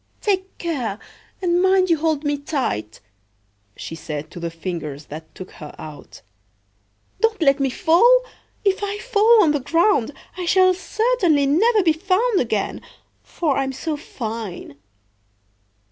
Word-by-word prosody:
"Take 385 -2 -1
care, 260 - -3 0.5
and 350 0 +2
mind 375 -1 +3
you 330 - +4
hold 310 -1 0
me 290 -1 0
tight!" 260 - -3 0.8
she - - -7
said 155 -2 -6
to - - -9
the 170 0 -3
Fingers 165 -4 -6
that 160 +1 -10
took 185 - -9
her 150 -3 -11
out. 155 -2 -11 1.0
"Don't 450 -1 +1
let 280 -4 +3
me 275 -1 +1
fall! 470 - +4 0.4
If 390 0 +2
I 405 0 -2
fall 445 -1 +4
on 315 - +3
the 295 - 0
ground 330 - +2 0.3
I 360 - -3
shall 370 +1 +5
certainly 375 - +1
never 410 +9 +3
be 325 -3 +4
found 385 +6 +1
again, 220 -5 -2 0.4
for 305 -6 -1
I - - +1
am 265 0 -3
so 310 +4 -3
fine!" 225 - -6
315 Hz, 145 wpm, -21 LUFS, -, 1.0 s, shall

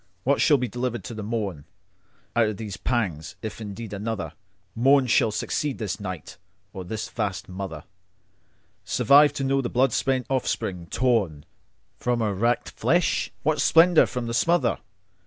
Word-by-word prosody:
What 140 +2 +2
shall 145 - +5
be 125 -1 -1
delivered 120 0 -3
to 120 - -7
the 110 - -6
mornOut 105 -8 -3 0.7
of 110 -3 +2
these 105 -3 -5
pangs, 95 - -2
if 110 +1 -6
ever 110 - -5
indeed 105 +1 -7
anotherMorn 105 +4 -1
shall 115 -1 +3
succeed 135 +6 -2
this 105 -2 -3
night, 95 -6 -7 0.3
or 95 - -6
this 105 +5 -4
vast 95 -4 -3
motherSurvive 95 - -1
to 140 - -3
know 135 0 +2
the 120 - -3
blood 125 -1 +2
spent 130 -2 0
offspring, 110 -9 -2
tornFrom 105 - 0 0.7
her 110 -3 0
racked 115 +5 0
flesh?—What 155 -3 0
splendour 165 +3 +6
from 125 -1 -4
the 115 - -3
smother? 155 -2 +2
115 Hz, 140 wpm, -25 LUFS, 95-130 Hz, 0.7 s, splendour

